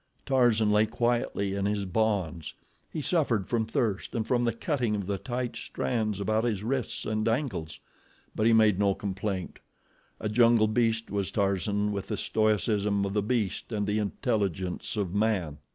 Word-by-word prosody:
Tarzan 120 -5 +3
lay 105 +1 +4
quietly 120 -4 0
in 100 0 0
his 105 -1 -1
bonds. 95 -6 -1 0.4
He 155 - -4
suffered 130 - +1
from 115 -2 0
thirst 110 -2 -1
and 110 -2 0
from 120 -1 +1
the 115 - +2
cutting 120 -1 -1
of 100 -2 -3
the 100 0 -2
tight 120 +4 -3
strands 105 - -2
about 110 +3 +1
his 105 -5 -1
wrists 130 +1 -2
and 110 0 -1
ankles; 115 - -2 0.5
but 110 - +1
he - - +5
made 110 -4 +5
no 100 -1 +3
complaint. 95 -1 -4 0.6
A - - -2
jungle 115 0 +4
beast 115 0 0
was 100 -2 -1
Tarzan 100 +1 0
with 100 -2 -4
the - - -2
stoicism 105 -2 +1
of 100 - -3
the 105 - +2
beast 110 0 -1
and 105 -2 -1
the 105 +1 0
intelligence 100 - -2
of 95 -4 -1
man. 100 -8 0
105 Hz, 170 wpm, -28 LUFS, 100-115 Hz, 0.6 s, he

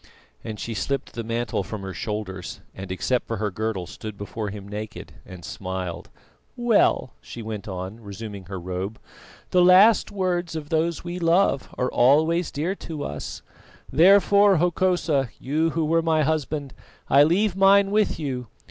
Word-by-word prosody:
and 110 -2 -6
she 115 - -4
slipped 135 +5 -3
the 115 - -4
mantle 115 0 -2
from 105 -3 -6
her 95 -1 -5
shoulders 95 -2 -5
and 95 -1 -8
except 110 +7 -1
for 115 - -3
her 105 0 -2
girdle 105 -2 -3
stood 105 +3 -8
before 105 +1 -5
him 100 0 -8
naked, 105 +1 -7
and 90 -2 -10
smiled. 95 -2 -5 0.5
"Well," 230 - +2
she 120 - -9
went 110 -2 -6
on, 95 +3 -6
resuming 100 -2 -8
her 95 +1 -6
robe, 95 +4 -4 0.5
"the 180 - +4
last 185 +5 +6
words 180 -4 -1
of 150 -2 -5
those 165 +1 0
we 175 +1 -5
love 170 -4 +2
are 125 - 0
always 155 +7 +3
dear 160 +6 -2
to 155 -3 -6
us; 75 0 -6 0.5
therefore, 200 +5 +6
Hokosa, 175 -5 +1
you 155 +5 0
who 165 0 -1
were 165 +2 +2
my 160 -1 +2
husband, 150 -2 -2 0.3
I 140 - +6
leave 180 +6 +3
mine 195 +1 +5
with 215 0 +2
you. 130 -5 -4
135 Hz, 160 wpm, -24 LUFS, 105-170 Hz, 0.5 s, last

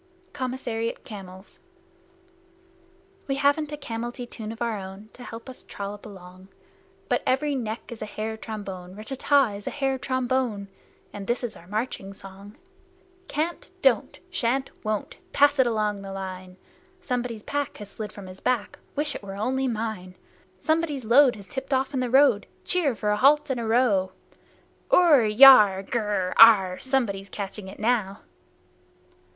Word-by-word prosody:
COMMISSARIAT 245 -3 -3
CAMELS 190 -2 -10 1.7
We 275 - 0
haven't 285 +2 +1
a 295 - -4
camelty 240 -1 -5
tune 220 -2 -7
of 225 - -9
our 230 -3 -1
own 195 +3 -10
To 250 - -12
help 230 +1 -9
us 260 - -9
trollop 200 +1 -7
along, 185 -1 -13 0.6
But - - +1
every 290 +3 +1
neck 230 -4 -4
is 235 - -8
a 215 - -4
hair 215 +1 -4
trombone 195 -5 -7
(Rtt 215 +1 -9
ta 270 - -3
ta 285 -4 +4
ta! - - -8
is 205 - -11
a - - +1
hair 270 -2 -1
trombone!) 250 -6 -1 0.4
And 200 -1 -7
this 240 -1 -2
our 170 - -15
marching 210 -1 -4
song: 195 +2 -12 0.7
Can't! 320 +4 -3
Don't! 240 -6 +2
Shan't! 265 -2 0
Won't! 215 -1 -3 0.2
Pass 290 0 +4
it 260 - +5
along 210 -3 -1
the 195 0 -8
line! 185 -1 -7 0.5
Somebody's 245 -5 -3
pack 285 -2 -3
has 205 -1 -10
slid 215 -1 -6
from 200 - -10
his 185 0 -10
back, 240 -5 -1 0.2
Wish 295 +1 0
it - - -7
were 195 -1 -8
only 260 +6 -1
mine! 215 -6 -4 0.4
Somebody's 310 - 0
load 250 +2 +6
has 200 -2 -11
tipped 265 +6 -3
off 265 +2 -1
in 265 - 0
the 250 -1 -1
road 260 -5 +4 0.2
Cheer 310 - +1
for 210 -1 -1
a 210 - +1
halt 285 +4 +4
and 255 - -1
a 230 - -3
row! 220 -5 +2 0.8
Urrr! 295 -11 +5
Yarrh! 215 -8 +9
Grr! 205 -5 -1
Arrh! 195 -5 +7
Somebody's 225 -8 -1
catching 200 0 -6
it 190 - -10
now! 215 -3 0
225 Hz, 160 wpm, -25 LUFS, 200-260 Hz, 1.7 s, Yarrh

